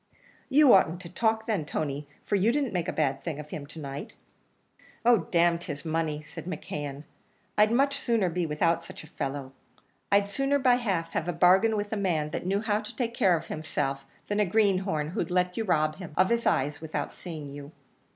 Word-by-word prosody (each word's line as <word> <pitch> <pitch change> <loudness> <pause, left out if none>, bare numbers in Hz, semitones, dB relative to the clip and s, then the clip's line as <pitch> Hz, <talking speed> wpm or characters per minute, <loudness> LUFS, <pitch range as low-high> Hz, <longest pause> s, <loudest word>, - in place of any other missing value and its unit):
"You 285 -1 +7
oughtn't 175 -2 +4
to 170 - -9
talk 220 +4 0
then, 210 -8 0
Tony, 145 -1 -3 0.2
for 205 - +1
you 200 +4 +3
didn't 275 -3 -1
make 175 -3 -1
a - - 0
bad 135 -3 0
thing 155 -4 -4
of 150 0 -9
him 145 -2 -6
to 155 +2 -10
night." 140 -1 -6 0.9
"Oh, 230 -10 +4
d 175 - +1
n 170 0 +4
his 145 -4 -6
money," 160 -2 -1
said 155 - -10
McKeon; 145 -5 -5 0.5
"I'd 210 +1 +4
much 275 +3 +2
sooner 230 -6 +1
be 175 0 -1
without 165 +2 +1
such 165 - -10
a - - -12
fellow. 135 -1 -4 0.6
I'd 200 0 +3
sooner 275 +5 +1
by 255 -3 +4
half 190 -9 -1
have 160 - -1
a 175 - 0
bargain 190 +6 +4
with 205 +1 -3
a - - -1
man 160 -6 0
that 175 - -4
knew 200 +2 +1
how 210 -2 +1
to 215 - -9
take 235 -2 -2
care 180 -6 +3
of - - -7
himself, 140 -3 -3 0.2
than 205 0 -1
a 210 - +4
greenhorn, 190 -6 +1
who'd 175 -1 -2
let 180 0 +1
you 225 - -2
rob 155 -4 +1
him 180 -5 -8
of 185 - +4
his 235 0 +1
eyes 145 +3 +1
without 160 -1 -4
seeing 155 -5 -8
you." 145 +1 -9
175 Hz, 210 wpm, -28 LUFS, 150-210 Hz, 0.9 s, You